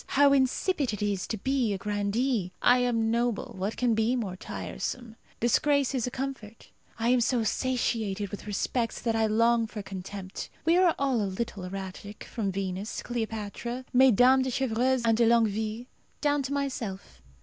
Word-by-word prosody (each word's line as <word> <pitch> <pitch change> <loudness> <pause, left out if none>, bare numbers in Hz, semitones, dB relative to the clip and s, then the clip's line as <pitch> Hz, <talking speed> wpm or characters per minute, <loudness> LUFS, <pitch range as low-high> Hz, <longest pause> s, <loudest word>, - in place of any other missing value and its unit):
How 280 0 +5
insipid 275 - +1
it 210 - -3
is 200 -3 -1
to 220 - -3
be 250 0 0
a - - -2
grandee! 205 +1 -1
I 245 +1 +5
am 230 -2 +1
noble; 235 -1 -1
what 195 +4 -3
can 245 -2 +2
be 225 +3 +2
more 205 -7 -3
tiresome? 230 +4 -5 0.2
Disgrace 280 +4 +2
is 250 -3 0
a - - 0
comfort. 250 -4 -6 0.3
I 230 +1 0
am 250 0 +4
so 235 0 +1
satiated 220 -4 -1
with 205 - -7
respect 230 +3 -2
that 230 -2 +1
I 220 -1 +2
long 230 +1 +3
for 215 -2 -7
contempt. 195 0 -7 0.2
We 330 +1 +4
are 360 -2 +4
all 270 -5 +1
a 200 - -1
little 200 -1 -4
erratic, 195 +2 -7
from 210 -5 -3
Venus, 190 +2 -4
Cleopatra, 235 +1 -4
Mesdames 260 +1 +6
de - - -1
Chevreuse 255 0 +1
and 225 -1 +3
de 235 -1 +4
Longueville, 220 0 +1 0.3
down 290 -1 +2
to 270 0 -4
myself. 225 - -4
230 Hz, 170 wpm, -28 LUFS, 205-255 Hz, 0.3 s, Mesdames